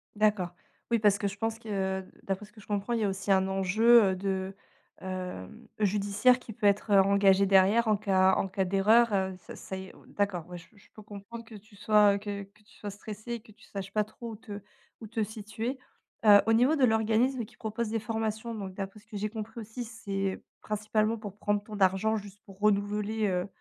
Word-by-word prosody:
D'accord. 210 -4 +2 0.4
Oui, 235 -1 +2
parce 205 -1 +4
que 205 - -1
je 195 +1 -6
pense 225 +1 -2
que 190 -4 -2 0.2
d'après 195 +2 -3
ce 210 - -21
que 215 - -16
je 205 - -16
comprends, 205 +3 -1
il 230 - +1
y - - 0
a - - +1
aussi 195 +1 -2
un 190 0 +4
enjeu, 215 +5 +5
heu, - - -1
de, 190 0 -2 0.5
hem, 185 - -6
judiciaire 205 +4 +3
qui 245 - -11
peut 210 - -4
être, 205 +1 +1
heu, 195 - +7
engagé 195 0 +4
derrière 195 +4 +4
en 215 - +4
cas 190 -2 +3
en 195 - -1
cas 190 0 -1
d'erreur, 210 +5 +4
heu, 190 -1 0
ça 175 - -11
ça 190 - -7
y 190 - -7
est - - -14
on - - -18
on - - -21
d'accord, 200 -5 -2
ouais, 180 - -7
je 175 - -13
je 200 - -21
peux 215 - -12
comprendre 210 +3 -10
que 225 -1 -12
tu 205 0 -15
sois, 205 0 +5
heu, - - -1
que 200 -1 -5
que 210 +2 -21
tu 210 - -22
sois 205 - -6
stressé 215 +3 -8
et 235 - -3
que 215 - -18
tu 225 +3 -20
saches 195 0 -6
pas 215 - +2
trop 225 +2 -9
où - - -7
te 210 -2 -8 0.4
où 220 - -9
te 225 0 -1
situer. 220 +4 -5 0.5
Heu, 205 -1 +9
au 225 - +2
niveau 250 +7 +4
de 280 - +1
l'organisme 225 +3 +2
qui - - -20
propose 220 +1 -3
des 225 0 -1
formations, 220 +1 -3
donc 195 -4 -6
d'après 195 +2 -6
ce 210 - -25
que 220 - -11
j'ai 210 +1 -2
compris 225 +1 -7
aussi, 225 +3 -6
c'est 195 -4 -4 0.2
principalement 215 +1 0
pour 205 -2 -9
prendre 205 -1 0
ton 210 0 -8
argent 195 +4 +3
juste 205 0 -10
pour 195 -1 -15
renouveler, 210 +1 +1
heu 180 0 -1
210 Hz, 235 wpm, -29 LUFS, 195-220 Hz, 0.5 s, Heu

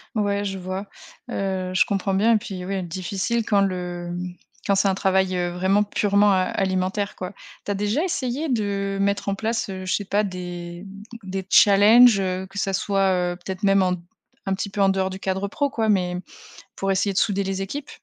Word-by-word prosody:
Ouais, 205 -1 0
je 195 -1 -3
vois. 185 +2 -5 0.4
Heu, 190 -2 -2
je 185 - +4
comprends 195 -1 -1
bien 220 +4 +4
et - - +5
puis, 185 -3 -6
oui, 195 -1 -2
difficile 190 +6 -2
quand 200 -2 +3
le, 180 -2 -2
mmh, 180 0 -5 0.3
quand 200 - +3
c'est 195 0 +3
un 190 - +1
travail, 190 -1 +1
heu, 175 0 0
vraiment 190 +3 +2
purement, 205 0 +2
heu, 185 -1 +1
alimentaire, 190 +1 -1
quoi. 185 0 -6 0.3
Tu 205 - -2
as - - 0
déjà 210 - 0
essayé 290 -3 -2
de 200 -4 -1
mettre 200 0 0
en 195 - 0
place, 225 0 -2
heu, 185 -1 -6
je 185 - 0
sais 205 - 0
pas 205 +2 +1
des 175 -1 -7 0.4
des 190 0 -4
challenges, 210 +2 +7
heu, 185 0 -2
que 200 +1 -6
ça 195 0 -1
soit, 195 0 +1 0.2
heu, - - -5
peut-être 190 +2 -7
même 195 -1 +4
en 180 -1 +2
d 180 - -5 0.5
un 190 - +1
petit 200 - -4
peu 200 - -2
en 195 - +5
dehors 190 0 0
du 190 - -7
cadre 190 +1 -2
pro 285 +6 -1
quoi, 225 -4 -1
mais 180 -3 +1 0.6
pour 195 0 -1
essayer 195 +1 +1
de 190 - -5
souder 200 -1 +2
les 195 0 -3
équipes? 285 +8 -6
195 Hz, 215 wpm, -23 LUFS, 185-205 Hz, 0.6 s, challenges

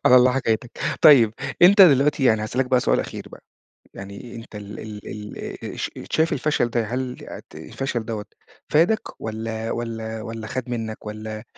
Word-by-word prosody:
على 125 - +8
الله 125 0 +6
حكايتك، 120 -2 0 0.3
طيب 120 -8 +7 0.3
أنت 195 +3 +9
دلوقتي 145 -3 +5
يعني 110 -4 +4
هاسألك 125 +4 -1
بقى 125 -1 +3
سؤال - - +2
أخير - - -7
بقى، - - -14 0.5
يعني 100 +5 -9
أنت 115 -2 -10
ال 105 0 -8 0.3
ال 105 0 -7 0.3
آآ - - -6
ش - - -3 0.2
شايف 160 +1 +2
الفشل 145 -3 +1
ده 120 0 0
هل 125 +2 -3 0.3
ت - - -16
الفشل 120 +9 -4
دَوَّة 110 -2 -4 0.4
فَادك 170 +9 +1
والّا 110 0 -4
والّا 115 -1 -4
والّا 110 0 -6
خَد 130 +2 -4
منك، 110 -3 -4
والّا 110 0 -6
115 Hz, 165 wpm, -23 LUFS, 110-130 Hz, 0.5 s, أنت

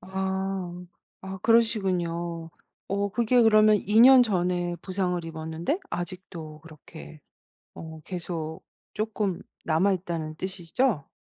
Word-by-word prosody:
아. 190 -1 -3 0.4
아 190 0 -6
그러시군요. 175 -8 +1 0.4
어 200 +1 0
그게 240 +2 +3
그러면 215 -1 +6
2 210 +3 +2
년 255 +1 +9
전에 180 -3 0
부상을 180 -2 -2
입었는데 160 - -3
아직도 175 -3 -6
그렇게 155 0 -13 0.5
어 160 -1 -9
계속 165 -2 -5 0.3
쪼끔 210 -4 -2 0.2
남아있다는 170 -2 0
뜻이죠? 190 - -1
180 Hz, 225 characters per minute, -26 LUFS, 165-200 Hz, 0.5 s, 년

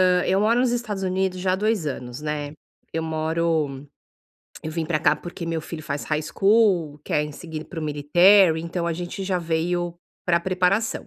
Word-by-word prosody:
Hã, 180 -1 +4
eu 190 +1 +2
moro 230 +4 +3
nos 250 -2 +2
Estados 225 -5 -3
Unidos 185 0 -1
já 185 0 +1
há - - +2
2 210 -4 0
anos, 125 -2 -5
né. 150 -1 -3 0.4
Eu 165 - -1
moro 160 -3 -1 0.8
eu 155 - -4
vim 160 0 -3
pra 160 -1 +1
cá, - - +4
porque 170 +2 -7
meu 165 -1 -2
filho 155 0 -7
faz 145 -1 -4
high 155 0 -1
school, 190 -4 +2
quer 150 0 0
seguir 160 0 -7
para 175 - -8
o - - -3
military, 160 +4 +5
então 170 +1 -3
a 170 - 0
gente 175 +3 -5
já 185 -1 0
veio 170 +1 -1 0.3
pra 170 -1 +2
preparação. 185 +5 0
170 Hz, 190 wpm, -24 LUFS, 155-185 Hz, 0.8 s, military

